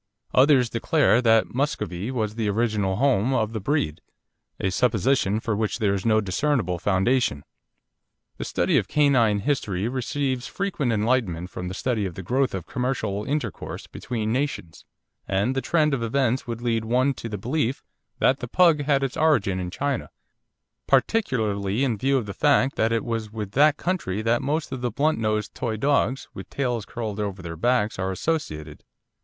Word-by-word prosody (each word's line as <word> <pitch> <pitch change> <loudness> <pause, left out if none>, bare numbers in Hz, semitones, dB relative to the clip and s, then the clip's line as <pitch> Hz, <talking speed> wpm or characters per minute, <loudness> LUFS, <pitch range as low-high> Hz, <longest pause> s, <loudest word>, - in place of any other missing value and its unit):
Others 130 -3 +5
declare 120 0 +3
that 115 -2 +3
Muscovy 110 -7 -2
was 110 -5 -2
the 110 -2 -1
original 105 -3 0
home 130 0 +2
of 110 -2 0
the 110 - -2
breed, 100 - -1 0.6
a 95 - 0
supposition 110 0 +2
for 115 -2 -2
which 110 +1 -1
there 105 -4 +1
is 100 +2 -2
no 110 -1 +4
discernible 100 - 0
foundation. 95 - +1 1.0
The - - -2
study - - +2
of - - -4
canine 130 -9 +3
history 105 -6 -1
receives 130 +1 -2
frequent 175 -10 -2
enlightenment 105 -6 0
from 90 - -5
the 90 - -5
study 110 -4 -1
of 90 - -8
the 95 - -7
growth 130 +3 0
of 90 - -5
commercial 110 -5 -2
intercourse 145 -8 -4
between 110 -3 -3
nations, 130 - -3 0.4
and 100 +6 +1
the 135 - 0
trend 155 -2 +2
of 130 - -1
events 125 +2 0
would 120 0 -5
lead 115 -2 0
one 125 +5 +2
to 115 - -7
the 105 - -4
belief 130 +4 -1 0.3
that 130 - +3
the 125 - -5
Pug 165 +2 +4
had 140 -1 +2
its 135 0 -2
origin 135 -13 +2
in 90 -1 -3
China, 140 +7 -2 0.8
particularly 115 - +1
in 125 -5 +1
view 135 +3 +2
of 120 - -2
the 100 - -6
fact 140 0 +3
that 110 +1 +1
it 115 -1 +1
is 115 -3 -3
with 105 -3 -5
that 145 +5 +4
country 110 - -2
that 115 +1 +2
most 150 +2 -2
of 130 -2 -4
the 125 - 0
blunt 150 +3 +1
nosed 110 -1 -1
toy 115 -3 -3
dogs, 135 +1 +1
with - - -9
tails 120 -6 -2
curled 110 -3 -5
over 100 -2 -3
their 85 -1 -6
backs, 110 +2 +1
are 95 0 -1
associated. 80 - -3
115 Hz, 175 wpm, -24 LUFS, 105-135 Hz, 1.0 s, Others